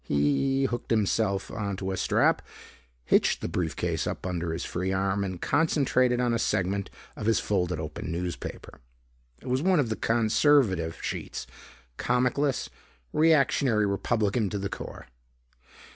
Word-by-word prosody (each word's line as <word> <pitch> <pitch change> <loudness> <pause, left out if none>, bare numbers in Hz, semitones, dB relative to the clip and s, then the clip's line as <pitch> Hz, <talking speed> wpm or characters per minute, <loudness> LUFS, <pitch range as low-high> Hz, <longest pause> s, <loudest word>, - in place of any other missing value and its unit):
He 75 - +1
hooked 120 -2 -3
himself 105 -2 +1
onto 100 -3 -3
a - - -1
strap, - - +2 0.6
hitched - - +3
the - - -2
briefcase - - -2
up - - -4
under 85 -2 -2
his 80 - -3
free 95 +2 -2
arm, 95 +1 0
and 95 -2 -4
concentrated 130 - +2
on 120 -1 +1
a 115 - 0
segment 100 -2 0 0.3
of 105 - -4
his 115 -2 +3
folded 90 -5 -1
open 80 +2 -5
newspaper. 85 0 -5 0.6
It - - -10
was 130 +1 +1
one 185 0 +3
of 130 -6 +1
the 110 - -1
conservative 110 - +2
sheets, - - -4 0.5
comic 125 +2 +1
less, 140 -3 0 0.5
reactionary 140 -8 +3
Republican 100 +1 0
to 100 - -3
the 100 0 -3
core. - - -8
105 Hz, 145 wpm, -27 LUFS, 95-125 Hz, 0.6 s, hitched